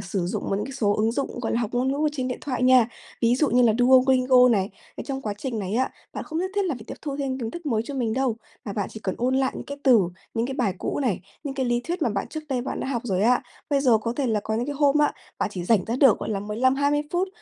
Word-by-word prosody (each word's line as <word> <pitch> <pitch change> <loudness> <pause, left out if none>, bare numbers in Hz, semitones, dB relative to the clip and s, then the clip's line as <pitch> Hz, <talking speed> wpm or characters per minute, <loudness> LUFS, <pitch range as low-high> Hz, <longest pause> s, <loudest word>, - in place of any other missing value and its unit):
sử 185 -2 -2
dụng 180 - -3
những 200 +1 0
cái 270 - -7
số 215 -6 +1
ứng 220 +2 +2
dụng, 275 -2 -3
gọi 230 - -2
là, 235 - +1
học 220 - -2
ngôn 250 +2 +1
ngữ 280 - -2
ở - - +4
trên 260 -3 -2
điện 250 - -4
thoại 255 -3 -3
nha, 255 -2 +6 0.3
ví 235 +1 +4
dụ 290 +1 +1
như 250 +1 +4
là 225 -2 +5
Duolingo 255 0 +5
này. 200 -2 +1 0.3
Trong 270 -1 -4
quá 210 -2 -3
trình 240 -2 -3
này 195 +1 -3
á, 260 +2 +1 0.2
bạn - - -5
không 315 - -4
nhất 375 +2 -1
thiết 405 -1 +1
là 335 -7 -1
phải 220 -3 -10
tiếp - - -6
thu 285 -3 -4
thêm 270 -2 -2
kiến 230 -3 -3
thức 345 +2 -8
mới 225 -5 +1
cho 285 - -6
mình 235 -4 -1
đâu, 255 -3 0 0.3
mà 200 - -4
bạn 200 -2 -2
chỉ 220 - -8
cần 190 - -2
ôn 255 +2 +1
lại 265 -1 +1
những - - -6
cái 280 0 -6
từ, 250 -5 +7 0.3
những 230 +1 0
cái 270 - -4
bài 220 -8 0
cũ - - -2
này, 225 -10 0 0.2
những 275 - -4
cái 265 -2 -1
lý 240 0 +1
thuyết 340 +6 -4
mà 245 - +3
bạn 200 -2 -2
trước 310 - -5
đây 255 -2 0
bạn 270 - -4
đã - - -3
học 240 -4 -2
rồi 195 -4 0
á. 245 +4 +3 0.3
Bây 280 -1 +3
giờ 240 -5 +4
có 230 +2 -2
thể 280 - 0
là 220 -3 +1
có 220 +2 -3
những 235 +3 -1
cái 290 - -3
hôm 285 0 +3
á, 295 - +3 0.3
bạn - - 0
chỉ 180 -2 -4
rảnh 200 -1 +3
ra 230 +3 -2
được 265 -6 +5
gọi - - -4
là 200 - -1
15-20 260 +8 +1
phút, 365 +2 +1
250 Hz, 305 wpm, -25 LUFS, 220-275 Hz, 0.3 s, từ